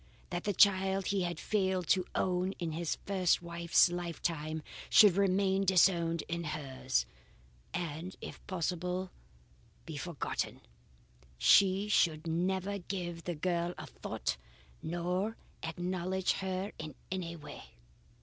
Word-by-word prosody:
That 175 Hz, 0 st, -3 dB
the 205 Hz, -, +1 dB
child 195 Hz, 0 st, +4 dB
he 195 Hz, -1 st, +1 dB
had 175 Hz, -2 st, -2 dB
failed 190 Hz, -4 st, 0 dB
to 185 Hz, -1 st, +3 dB
own 185 Hz, +1 st, +1 dB
in 170 Hz, -4 st, -4 dB
his 165 Hz, +1 st, -2 dB
first 185 Hz, -3 st, +2 dB
wife's 170 Hz, +1 st, +4 dB
lifetime 165 Hz, -3 st, -3 dB, 0.3 s
should 205 Hz, -5 st, +8 dB
remain 195 Hz, 0 st, +3 dB
disowned 170 Hz, -3 st, +3 dB
in 170 Hz, 0 st, -2 dB
hers, 135 Hz, -, -1 dB, 0.7 s
and 170 Hz, +2 st, -4 dB
if -, -, -9 dB
possible 180 Hz, +1 st, -2 dB, 0.7 s
be 160 Hz, -3 st, -6 dB
forgotten. 165 Hz, 0 st, -3 dB, 0.8 s
She 195 Hz, -, +5 dB
should 165 Hz, -6 st, +2 dB
never 190 Hz, +4 st, 0 dB
give 175 Hz, -2 st, -5 dB
the 175 Hz, -, -2 dB
girl 175 Hz, +2 st, -1 dB
a -, -, -6 dB
thought -, -, -4 dB, 0.4 s
nor 180 Hz, +6 st, -1 dB, 0.2 s
acknowledge 180 Hz, +2 st, -1 dB
her 190 Hz, +1 st, -2 dB
in 155 Hz, -3 st, -6 dB, 0.2 s
any 175 Hz, -3 st, -3 dB
way. 150 Hz, -3 st, -10 dB
180 Hz, 120 wpm, -33 LUFS, 165-190 Hz, 0.8 s, should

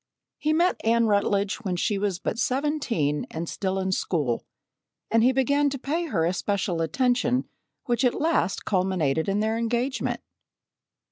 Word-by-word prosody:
He 305 Hz, -, +1 dB
met 345 Hz, +4 st, +2 dB
Anne 230 Hz, +1 st, +3 dB
Rutledge 200 Hz, -1 st, +1 dB
when 190 Hz, -4 st, -3 dB
she 195 Hz, +3 st, 0 dB
was 200 Hz, -3 st, 0 dB
but 215 Hz, +4 st, -3 dB
seventeen 250 Hz, -, 0 dB
and 165 Hz, +1 st, -5 dB
still 190 Hz, +2 st, -2 dB
in 190 Hz, 0 st, -1 dB
school, 150 Hz, -10 st, 0 dB, 0.7 s
and 230 Hz, -, +4 dB
he 255 Hz, -, +5 dB
began 280 Hz, +2 st, +2 dB
to 275 Hz, -, -4 dB
pay 320 Hz, +6 st, -2 dB
her 170 Hz, -, +1 dB
especial 180 Hz, 0 st, -1 dB
attention 250 Hz, -, +1 dB, 0.4 s
which 240 Hz, 0 st, 0 dB
at 250 Hz, -, +2 dB
last 315 Hz, -, +1 dB
culminated 180 Hz, -5 st, +1 dB
in 200 Hz, +2 st, +1 dB
their 220 Hz, +1 st, 0 dB
engagement. 240 Hz, +3 st, -1 dB
215 Hz, 150 wpm, -26 LUFS, 185-260 Hz, 0.7 s, he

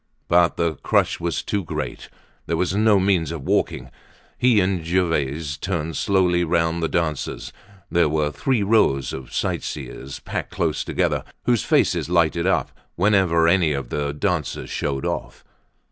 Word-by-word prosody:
But 85 Hz, 0 st, +3 dB
the 85 Hz, -3 st, 0 dB
crush -, -, +1 dB
was 85 Hz, -1 st, -2 dB
too 100 Hz, -2 st, -2 dB
great; -, -, -5 dB, 0.4 s
there 85 Hz, -, 0 dB
was 90 Hz, +2 st, 0 dB
no 105 Hz, -1 st, +4 dB
means 95 Hz, -5 st, +1 dB
of 80 Hz, -5 st, -6 dB
walking. 65 Hz, -1 st, -1 dB, 0.4 s
He 120 Hz, -4 st, +4 dB
and 90 Hz, -3 st, 0 dB
Gervaise 80 Hz, -4 st, -1 dB
turned 80 Hz, -1 st, -3 dB
slowly 90 Hz, -3 st, +2 dB
round 85 Hz, 0 st, +1 dB
the 80 Hz, -, +1 dB
dancers; 75 Hz, -4 st, -2 dB, 0.4 s
there 85 Hz, -3 st, +3 dB
were 75 Hz, -1 st, 0 dB
three 110 Hz, -, 0 dB
rows 100 Hz, -, +2 dB
of 65 Hz, -2 st, -8 dB
sightseers 70 Hz, -1 st, -4 dB
packed -, -, -4 dB
close -, -, -1 dB
together, -, -, 0 dB, 0.2 s
whose 120 Hz, -4 st, +2 dB
faces -, -, +2 dB
lighted 85 Hz, 0 st, +2 dB
up 95 Hz, -, +1 dB, 0.2 s
whenever 90 Hz, -4 st, +3 dB
any 85 Hz, -3 st, +3 dB
of 70 Hz, -3 st, -4 dB
the 70 Hz, -1 st, -2 dB
dancers 75 Hz, -, -2 dB
showed 70 Hz, -1 st, -2 dB
off. -, -, -4 dB
85 Hz, 150 wpm, -22 LUFS, 75-95 Hz, 0.4 s, no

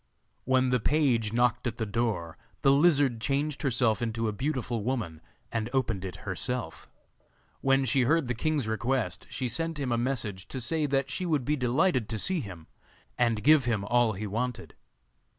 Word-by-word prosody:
When 130 Hz, 0 st, +2 dB
the 125 Hz, -, +3 dB
page 120 Hz, -5 st, +1 dB
knocked 120 Hz, +1 st, +1 dB
at 120 Hz, -1 st, -3 dB
the 110 Hz, -, -1 dB
door 100 Hz, -7 st, -2 dB, 0.3 s
the 135 Hz, -, +6 dB
lizard 140 Hz, -5 st, +3 dB
changed 140 Hz, +3 st, -1 dB
herself 120 Hz, -6 st, +1 dB
into 115 Hz, -1 st, -1 dB
a -, -, 0 dB
beautiful 125 Hz, -2 st, -2 dB
woman, 105 Hz, -10 st, -3 dB, 0.3 s
and 115 Hz, 0 st, -2 dB
opened 115 Hz, -8 st, 0 dB
it 95 Hz, -2 st, -5 dB
herself. 120 Hz, +6 st, -3 dB, 0.7 s
When 135 Hz, 0 st, +2 dB
she 130 Hz, +2 st, +2 dB
heard 155 Hz, +3 st, +2 dB
the 125 Hz, -, 0 dB
king's 145 Hz, +1 st, -1 dB
request 115 Hz, -3 st, -1 dB
she 130 Hz, -, -3 dB
sent 165 Hz, +5 st, -2 dB
him 135 Hz, -3 st, -2 dB
a 120 Hz, -, +1 dB
message 115 Hz, -7 st, -2 dB
to 130 Hz, -, -5 dB
say 150 Hz, +5 st, 0 dB
that 135 Hz, -1 st, 0 dB
she 180 Hz, +7 st, -2 dB
would 150 Hz, -6 st, 0 dB
be 150 Hz, -, +1 dB
delighted 130 Hz, -, +1 dB
to 110 Hz, -, -2 dB
see 185 Hz, -, +1 dB
him, 90 Hz, -, -8 dB, 0.5 s
and 115 Hz, -3 st, +1 dB
give 150 Hz, -2 st, +6 dB
him 110 Hz, -5 st, 0 dB
all 120 Hz, 0 st, +3 dB
he 105 Hz, +3 st, -5 dB
wanted. 120 Hz, +4 st, -3 dB
125 Hz, 180 wpm, -28 LUFS, 110-135 Hz, 0.7 s, the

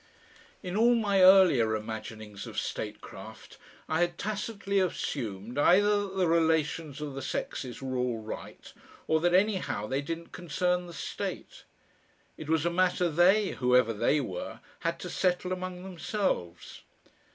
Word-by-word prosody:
2 180 Hz, -, -5 dB
In 180 Hz, -, -4 dB
all 235 Hz, +3 st, +5 dB
my 200 Hz, -4 st, +2 dB
earlier 185 Hz, -, +6 dB
imaginings 110 Hz, -1 st, -7 dB
of -, -, -9 dB
statecraft 105 Hz, -1 st, -6 dB, 0.3 s
I 160 Hz, -, 0 dB
had 175 Hz, -1 st, 0 dB
tacitly 205 Hz, -1 st, -2 dB
assumed 120 Hz, -, -3 dB
either 205 Hz, +5 st, +4 dB
that 190 Hz, -, -10 dB
the 185 Hz, -2 st, +2 dB
relations 160 Hz, -2 st, +1 dB
of 150 Hz, -2 st, -4 dB
the 135 Hz, -, -5 dB
sexes 130 Hz, 0 st, -4 dB
were 130 Hz, -1 st, -3 dB
all 125 Hz, -2 st, 0 dB
right 110 Hz, 0 st, -9 dB, 0.3 s
or 160 Hz, -, +2 dB
that 175 Hz, +1 st, +3 dB
anyhow 190 Hz, -, +1 dB
they 135 Hz, +5 st, -1 dB
didn't 165 Hz, +3 st, -6 dB
concern 180 Hz, +2 st, -1 dB
the 170 Hz, -, -10 dB
state. 155 Hz, -, -6 dB, 0.7 s
It 155 Hz, -, -9 dB
was 160 Hz, 0 st, +2 dB
a 170 Hz, -, +2 dB
matter 180 Hz, 0 st, +2 dB
they, 185 Hz, +6 st, +4 dB
whoever 125 Hz, -2 st, +3 dB
"they" 145 Hz, +7 st, +2 dB
were, 95 Hz, -10 st, -5 dB, 0.2 s
had -, -, -1 dB
to -, -, -5 dB
settle 180 Hz, 0 st, 0 dB
among 185 Hz, -1 st, -5 dB
themselves. 185 Hz, -, -3 dB
165 Hz, 150 wpm, -29 LUFS, 125-185 Hz, 0.7 s, earlier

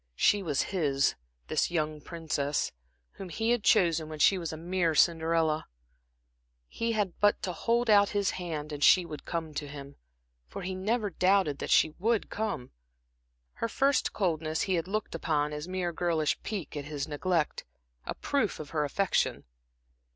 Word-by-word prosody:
She 205 Hz, -, +3 dB
was 150 Hz, -7 st, 0 dB
his, 145 Hz, -8 st, +1 dB, 0.3 s
this -, -, 0 dB
young 155 Hz, -3 st, -2 dB
princess, 155 Hz, -3 st, -2 dB, 0.4 s
whom 190 Hz, -, -9 dB
he 225 Hz, +8 st, 0 dB
had 240 Hz, -3 st, +1 dB
chosen 170 Hz, -9 st, +3 dB
when 155 Hz, -, -6 dB
she 190 Hz, +5 st, +4 dB
was 165 Hz, -2 st, -4 dB
a 160 Hz, -, -6 dB
mere 170 Hz, -1 st, 0 dB
Cinderella; 160 Hz, -1 st, +2 dB, 1.0 s
he 230 Hz, -, -2 dB
had 205 Hz, -5 st, -1 dB
but 205 Hz, 0 st, +4 dB
to 180 Hz, -, -2 dB
hold 235 Hz, +5 st, +1 dB
out 205 Hz, -2 st, +6 dB
his 200 Hz, -1 st, 0 dB
hand 155 Hz, -4 st, -5 dB
and 145 Hz, -1 st, -3 dB
she 180 Hz, -2 st, +6 dB
would 155 Hz, -3 st, -8 dB
come 165 Hz, -2 st, -4 dB
to 145 Hz, 0 st, -4 dB
him. 140 Hz, -1 st, -9 dB, 0.5 s
For -, -, -7 dB
he 190 Hz, +1 st, -3 dB
never 205 Hz, +3 st, -1 dB
doubted 185 Hz, -4 st, +2 dB
that -, -, -4 dB
she 155 Hz, -, +5 dB
would 225 Hz, +2 st, 0 dB
come. 210 Hz, -, -3 dB, 0.8 s
Her 230 Hz, -, -3 dB
first 275 Hz, +2 st, +2 dB
coldness 160 Hz, -5 st, -1 dB
he 190 Hz, -, 0 dB
had 170 Hz, -1 st, 0 dB
looked 215 Hz, +2 st, -3 dB
upon 150 Hz, -2 st, 0 dB
as 150 Hz, +2 st, -5 dB
mere 185 Hz, -2 st, -2 dB
girlish 160 Hz, -3 st, 0 dB
pique 200 Hz, -9 st, -5 dB
at 145 Hz, -1 st, -4 dB
his 145 Hz, -1 st, -4 dB
neglect, 155 Hz, +1 st, -1 dB, 0.4 s
a -, -, -5 dB
proof 275 Hz, -8 st, -1 dB
of 150 Hz, -2 st, -8 dB
her 155 Hz, -2 st, 0 dB
affection. 190 Hz, +7 st, 0 dB
170 Hz, 170 wpm, -29 LUFS, 155-200 Hz, 1.0 s, out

